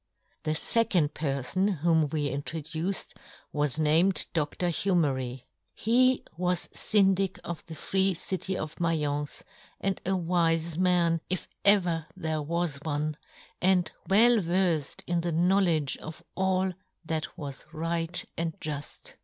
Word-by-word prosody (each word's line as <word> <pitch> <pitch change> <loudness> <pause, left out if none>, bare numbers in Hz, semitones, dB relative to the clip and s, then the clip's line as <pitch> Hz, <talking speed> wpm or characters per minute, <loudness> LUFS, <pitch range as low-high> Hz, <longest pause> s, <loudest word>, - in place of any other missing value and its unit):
The 155 - 0
fecond 180 -6 +2
perfon 155 +7 -1
whom 160 -3 +3
we 150 0 -1
intro 145 +4 -4
duced 160 +5 -3 0.4
was 145 -2 +5
named 160 +5 +4
Dr. 165 +2 0
Humery. 135 -9 0 0.3
He 255 +3 +3
was 180 +1 0
Syndic 195 -2 +2
of 170 -2 -6
the 160 - -8
free 190 +4 +2
city 185 +2 -3
of 155 0 -5
Maience, 150 -4 -1 0.4
and 195 -1 -2
a 190 +1 0
wife 165 -2 +1
man, 175 -2 +2
if 185 0 -2 0.2
ever 175 -6 +3
there 160 -3 -2
was 165 0 -1
one, 150 +1 -2 0.5
and 180 -2 +3 0.2
well 230 +5 +6
verfed 170 -4 0
in 175 -1 0
the 170 0 -2
knowledge 170 -3 +2
of 155 0 -9
all 190 0 +1 0.3
that 160 -1 -3
was 140 -3 -7
right 165 +2 0
and 165 -1 -3
juft. 145 -2 -6
165 Hz, 130 wpm, -28 LUFS, 155-185 Hz, 0.5 s, well